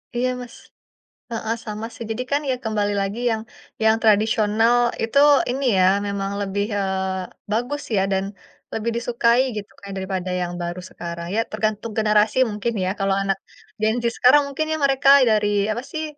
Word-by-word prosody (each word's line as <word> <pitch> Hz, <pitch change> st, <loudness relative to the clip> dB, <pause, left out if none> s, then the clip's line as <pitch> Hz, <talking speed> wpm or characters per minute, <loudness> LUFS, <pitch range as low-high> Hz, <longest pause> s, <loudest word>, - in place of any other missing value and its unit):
Iya, 250 Hz, +1 st, +1 dB
Mas 245 Hz, -1 st, -10 dB, 0.8 s
heeh, 225 Hz, 0 st, -2 dB
sama 215 Hz, 0 st, -5 dB
sih. -, -, -8 dB
Jadi 225 Hz, +3 st, -2 dB
kan, 285 Hz, +1 st, +2 dB
ya 260 Hz, -, +2 dB
kembali 210 Hz, -2 st, 0 dB
lagi 195 Hz, +3 st, -3 dB
yang 220 Hz, -1 st, -1 dB, 0.4 s
yang 220 Hz, 0 st, +5 dB
tradisional 220 Hz, +1 st, +3 dB, 0.3 s
itu 225 Hz, +4 st, -1 dB, 0.3 s
ini 270 Hz, +2 st, -2 dB
ya, 185 Hz, -, +5 dB, 0.2 s
memang 200 Hz, -1 st, -3 dB
lebih, 200 Hz, 0 st, -1 dB
eee, 190 Hz, -1 st, -3 dB
bagus 245 Hz, +7 st, -1 dB
ya 190 Hz, -, +3 dB
dan 190 Hz, 0 st, +1 dB, 0.5 s
lebih 225 Hz, +1 st, -1 dB
disukai 235 Hz, 0 st, +2 dB, 0.2 s
gitu, 205 Hz, -1 st, -6 dB
Kak, 200 Hz, -, -11 dB
daripada 190 Hz, -1 st, -3 dB
yang 175 Hz, 0 st, -3 dB
baru 175 Hz, +1 st, -4 dB
sekarang. 170 Hz, 0 st, -7 dB
Ya -, -, +2 dB
tergantung 215 Hz, +1 st, -2 dB
generasi 210 Hz, 0 st, +3 dB
mungkin 210 Hz, +3 st, -2 dB
ya, -, -, 0 dB
kalau 195 Hz, 0 st, +1 dB
anak 195 Hz, 0 st, 0 dB, 0.4 s
Gen 220 Hz, +1 st, +2 dB
Z -, -, -2 dB
sekarang, 260 Hz, +4 st, +6 dB
mungkin 295 Hz, +3 st, -2 dB
ya 315 Hz, -, -1 dB
mereka 275 Hz, 0 st, +3 dB, 0.2 s
dari 210 Hz, -1 st, +2 dB, 0.2 s
apa 230 Hz, +3 st, -2 dB
sih, 315 Hz, -1 st, -3 dB
215 Hz, 170 wpm, -22 LUFS, 195-235 Hz, 0.8 s, sekarang